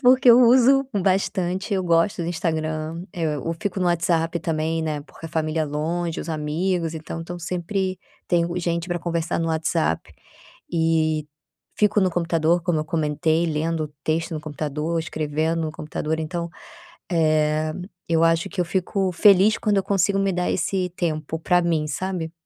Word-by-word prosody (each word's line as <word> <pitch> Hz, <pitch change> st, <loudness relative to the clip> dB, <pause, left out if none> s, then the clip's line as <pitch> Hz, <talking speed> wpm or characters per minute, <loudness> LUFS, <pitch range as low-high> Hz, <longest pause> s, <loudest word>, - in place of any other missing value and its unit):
porque 255 Hz, -1 st, +6 dB
eu 235 Hz, +2 st, +8 dB
uso 260 Hz, +3 st, +5 dB, 0.2 s
bastante, 190 Hz, +1 st, 0 dB
eu 190 Hz, -, 0 dB
gosto 170 Hz, +1 st, +2 dB
do 165 Hz, -, -3 dB
Instagram, 160 Hz, -1 st, -2 dB
eh, 160 Hz, -3 st, -1 dB
eu 155 Hz, +4 st, -3 dB
fico 205 Hz, -3 st, -2 dB
no 180 Hz, -, +1 dB
WhatsApp 170 Hz, -1 st, +1 dB
também, 160 Hz, 0 st, -1 dB
né, 155 Hz, -2 st, -2 dB
porque 160 Hz, +2 st, -11 dB
a -, -, -8 dB
família 155 Hz, 0 st, -1 dB
longe, 160 Hz, +3 st, -2 dB
os -, -, -7 dB
amigos, 165 Hz, +2 st, -1 dB
então 160 Hz, +1 st, -6 dB
estão 175 Hz, +1 st, -7 dB
sempre 185 Hz, +2 st, -2 dB, 0.3 s
tenho 170 Hz, 0 st, +1 dB
gente 170 Hz, 0 st, -1 dB
pra 175 Hz, -1 st, -2 dB
conversar 170 Hz, -1 st, -1 dB
no 165 Hz, -, -1 dB
WhatsApp, 155 Hz, -, -1 dB, 0.6 s
e 160 Hz, -2 st, +1 dB, 0.5 s
fico 210 Hz, 0 st, +3 dB
no 190 Hz, -, +3 dB
computador, 170 Hz, 0 st, +1 dB
como 170 Hz, -2 st, +1 dB
eu 155 Hz, -, -3 dB
comentei, 160 Hz, +1 st, 0 dB
lendo 160 Hz, 0 st, -1 dB, 0.2 s
texto 160 Hz, +1 st, -1 dB
no 155 Hz, -, -3 dB
computador, 150 Hz, +2 st, -3 dB
escrevendo 160 Hz, +1 st, -1 dB
no 155 Hz, -1 st, -3 dB
computador, 155 Hz, +1 st, -3 dB
então, 170 Hz, +2 st, -3 dB, 0.6 s
eh, 155 Hz, -1 st, +2 dB, 0.3 s
eu 165 Hz, 0 st, +3 dB
acho 165 Hz, 0 st, +2 dB
que 185 Hz, -, -4 dB
eu -, -, +2 dB
fico 190 Hz, +1 st, -1 dB
feliz 200 Hz, +4 st, +5 dB
quando 210 Hz, -2 st, +1 dB
eu -, -, +1 dB
consigo 195 Hz, 0 st, +1 dB
me 195 Hz, 0 st, +1 dB
dar 180 Hz, 0 st, 0 dB
esse 185 Hz, +1 st, 0 dB
tempo 160 Hz, -2 st, -2 dB
pra 180 Hz, +2 st, +3 dB
mim, 165 Hz, -3 st, +1 dB
sabe. 170 Hz, +1 st, -3 dB
165 Hz, 165 wpm, -23 LUFS, 155-180 Hz, 0.6 s, eu